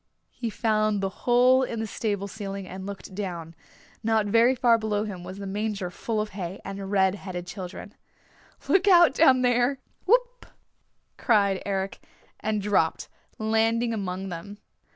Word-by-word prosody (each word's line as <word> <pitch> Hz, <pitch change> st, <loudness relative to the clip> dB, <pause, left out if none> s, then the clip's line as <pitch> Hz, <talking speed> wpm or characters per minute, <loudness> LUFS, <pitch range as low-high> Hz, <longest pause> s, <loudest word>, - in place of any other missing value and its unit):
He 235 Hz, -2 st, -4 dB
found 215 Hz, -2 st, +1 dB
the 195 Hz, +5 st, -4 dB
hole 250 Hz, +2 st, +6 dB
in 235 Hz, -3 st, -2 dB
the 225 Hz, -, -1 dB
stable 205 Hz, -2 st, -2 dB
ceiling 200 Hz, -2 st, -6 dB
and 190 Hz, +1 st, -7 dB
looked 200 Hz, -1 st, -8 dB
down. 175 Hz, -5 st, -5 dB, 0.5 s
Not 220 Hz, -1 st, +2 dB
very 230 Hz, +5 st, +4 dB
far 235 Hz, -2 st, +4 dB
below 210 Hz, -1 st, -1 dB
him 195 Hz, -5 st, -6 dB
was 185 Hz, +2 st, -8 dB
the 200 Hz, -, -6 dB
manger 200 Hz, -2 st, -3 dB
full 220 Hz, +4 st, -3 dB
of 210 Hz, 0 st, -2 dB
hay 190 Hz, -2 st, -6 dB
and 195 Hz, 0 st, -6 dB
red 190 Hz, -2 st, +3 dB
headed 185 Hz, -3 st, -6 dB
children. 185 Hz, 0 st, -8 dB, 0.7 s
"Look 390 Hz, +1 st, +3 dB
out 345 Hz, -6 st, +7 dB
down 265 Hz, -4 st, +5 dB
there! 245 Hz, +2 st, +2 dB, 0.3 s
Whoop!" -, -, +2 dB, 0.7 s
cried 200 Hz, -5 st, +2 dB
Eric, 195 Hz, -1 st, -2 dB, 0.4 s
and 215 Hz, -1 st, -1 dB
dropped, 195 Hz, -6 st, +1 dB, 0.3 s
landing 225 Hz, +2 st, +1 dB
among 190 Hz, -2 st, -4 dB
them. 185 Hz, +4 st, -7 dB
210 Hz, 150 wpm, -26 LUFS, 195-230 Hz, 0.7 s, out